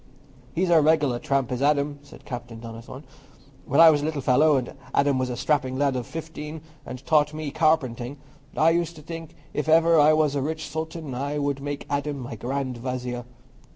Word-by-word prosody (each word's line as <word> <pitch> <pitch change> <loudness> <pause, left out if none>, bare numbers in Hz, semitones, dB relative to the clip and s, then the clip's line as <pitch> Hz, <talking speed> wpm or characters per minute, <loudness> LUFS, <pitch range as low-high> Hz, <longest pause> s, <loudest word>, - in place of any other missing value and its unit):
"He's 175 +1 +1
a 165 -2 +6
regular 145 -5 +2
trump, 135 -2 0
is 125 0 -2
Adam," 145 0 +1
said 145 - -16
Captain 120 -3 -7
Donnithorne. 115 +4 -9 0.6
"When 140 - +2
I 165 -1 +10
was 145 -2 +1
a - - -2
little 155 -2 -2
fellow, 145 +4 +4
and 125 -2 -3 0.2
Adam 140 -1 +3
was 130 -1 -1
a 120 - -4
strapping 135 -4 0
lad 140 -1 +1
of 125 -2 -3
fifteen, 160 -1 -7 0.3
and 130 +1 -8
taught 150 -1 +3
me 155 -2 -4
carpentering, 140 -5 +1 0.4
I 160 +2 +5
used 170 0 0
to 155 - -12
think 165 0 -8 0.2
if 150 +1 -2
ever 165 0 +5
I 150 +1 +6
was 155 -2 +2
a 140 - -1
rich 155 +3 -3
sultan, 160 -2 -5
I 140 +4 -2
would 140 -1 -1
make 145 0 -4
Adam 145 0 -2
my 125 -3 -6
grand 130 +1 -3
vizier. 125 -1 -4
145 Hz, 195 wpm, -25 LUFS, 130-155 Hz, 0.6 s, I